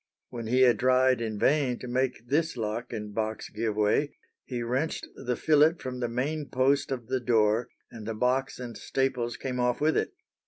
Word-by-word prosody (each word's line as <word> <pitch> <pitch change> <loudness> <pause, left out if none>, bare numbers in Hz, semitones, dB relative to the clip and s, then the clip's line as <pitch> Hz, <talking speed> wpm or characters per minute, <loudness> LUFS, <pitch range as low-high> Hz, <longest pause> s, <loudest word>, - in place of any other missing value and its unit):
When 115 -2 -6
he 125 +3 +3
had 120 -4 +5
tried 130 0 +3
in 110 -2 -3
vain 135 +1 +2
to 125 - -8
make 125 -1 -1
this 155 +2 0
lock 115 +2 -3
and 105 -3 -5
box 110 0 -3
give 110 -1 -2
way, 105 +8 +1 0.3
he 120 -2 -4
wrenched 130 +7 -1
the 125 0 -2
fillet 155 +3 +4
from 130 -5 -6
the 120 -1 -1
main 140 +4 -2
post 135 +3 +2
of 125 -3 -3
the 130 +2 -1
door 115 -1 +2 0.2
and 110 -2 -9
the 115 - -3
box 125 +4 0
and 120 -2 -6
staples 125 -3 -1
came 125 -2 -4
off 125 0 +1
with 155 +1 +2
it. - - 0
125 Hz, 195 wpm, -28 LUFS, 115-130 Hz, 0.3 s, had